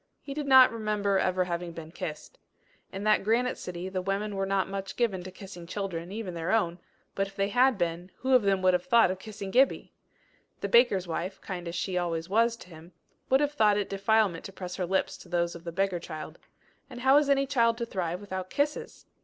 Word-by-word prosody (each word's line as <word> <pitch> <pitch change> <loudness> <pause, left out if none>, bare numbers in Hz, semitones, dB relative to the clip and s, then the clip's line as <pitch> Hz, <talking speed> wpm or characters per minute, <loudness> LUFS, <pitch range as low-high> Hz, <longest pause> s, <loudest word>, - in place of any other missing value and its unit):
He 275 - -7
did 295 0 -4
not 260 -1 +8
remember 210 -3 0
ever 185 0 +1
having 175 -1 -4
been 165 -1 -9
kissed. 155 -3 -7 0.5
In 195 +1 -6
that 215 -1 +3
granite 235 +4 +1
city, 180 0 -6
the 190 -1 -3
women 200 +2 -2
were 195 0 -1
not 195 -1 +1
much 195 0 -5
given 215 -7 0
to 185 - -8
kissing 185 -2 -11
children, 185 -2 -4
even 210 -3 -5
their 170 +1 -3
own, 180 -6 +1 0.3
but 195 0 -1
if 195 - -15
they 195 0 0
had 250 +1 +3
been, 175 0 -2
who 265 0 0
of 255 - +7
them 195 -2 +1
would 185 0 +5
have 180 - +1
thought 235 -7 +5
of 185 - -5
kissing 200 -2 -7
Gibbie! 265 +5 +2 0.7
The 200 - -2
baker's 200 -5 +4
wife, 185 +3 -4
kind 180 -2 -6
as 170 - -5
she 180 +1 -1
always 170 -1 -3
was 230 +3 +3
to 185 - -14
him, 165 +1 -13 0.4
would 265 +2 +4
have 290 0 +1
thought 210 -6 +3
it 205 - -2
defilement 200 -3 +2
to - - -7
press 180 -2 -7
her 180 - -2
lips 190 +1 0
to 180 - -14
those 170 0 0
of 170 0 -11
the 170 - -4
beggar 190 0 0
child. 155 -2 -8 0.5
And 245 -2 -9
how 265 +2 +6
is 295 -1 +3
any 275 0 +3
child 235 -4 +2
to 235 - -2
thrive 180 -5 -3
without 190 -2 -5
kisses! 295 +1 -2
195 Hz, 225 wpm, -28 LUFS, 180-225 Hz, 0.7 s, not